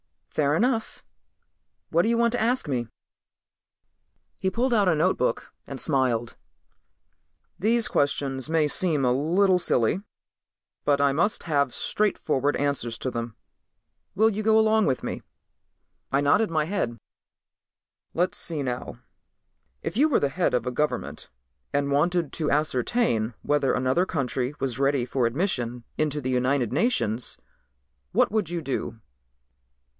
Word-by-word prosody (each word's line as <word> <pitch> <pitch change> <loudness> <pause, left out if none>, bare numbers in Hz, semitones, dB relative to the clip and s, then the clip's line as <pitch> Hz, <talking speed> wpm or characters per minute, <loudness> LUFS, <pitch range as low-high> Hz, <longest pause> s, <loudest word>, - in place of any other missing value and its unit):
"Fair 145 0 +1
enough. 230 +4 0 0.9
What 170 +2 +3
do 225 - +1
you 235 - +2
want 235 0 +3
to 245 - -1
ask 245 -1 +1
me?" 125 -4 -1 1.5
He 190 - 0
pulled 240 +6 0
out 205 -4 +3
a 170 - +4
notebook 155 -7 0
and 135 -1 -6
smiled. 125 -6 0 1.2
"These 225 +4 +2
questions 140 -1 0
may 160 -2 +2
seem 155 -2 +1
a 125 - +3
little 180 +8 +3
silly 125 - +1 0.8
but 140 -1 +3
I 140 -1 +4
must 170 +10 0
have 140 -5 +1
straight 210 0 0 0.4
answers 135 -5 -1
to 130 - -3
them. 115 -1 -5 0.8
Will 220 +3 +4
you 215 0 -3
go 220 0 +4
along 220 -1 +4
with 130 -2 0
me?" - - -4 0.9
I 140 - +2
nodded 205 +10 +3
my 155 -2 +1
head. 155 - -2 1.2
"Let's 180 +2 +1
see 160 -4 -1
now. 125 -1 -5 0.8
If - - -4
you 295 +4 +5
were 275 - +2
the 140 - +2
head 175 +6 0
of 125 - -1
a 125 - -1
government 150 +4 -3 0.4
and 140 0 0
wanted 170 +2 +1
to 155 -3 -1
ascertain 130 - 0
whether 145 -3 +1
another 130 +8 +1
country 135 -2 -2
was 130 -2 -2
ready 135 -2 +2
for 125 -1 0
admission 125 - -2
into 150 -1 0
the 130 -1 -2
United 125 -1 +1
Nations, 130 - 0 0.8
what - - +3
would 210 -6 0
you 175 -1 -3
do?" 135 -5 -4
145 Hz, 140 wpm, -25 LUFS, 130-190 Hz, 1.5 s, you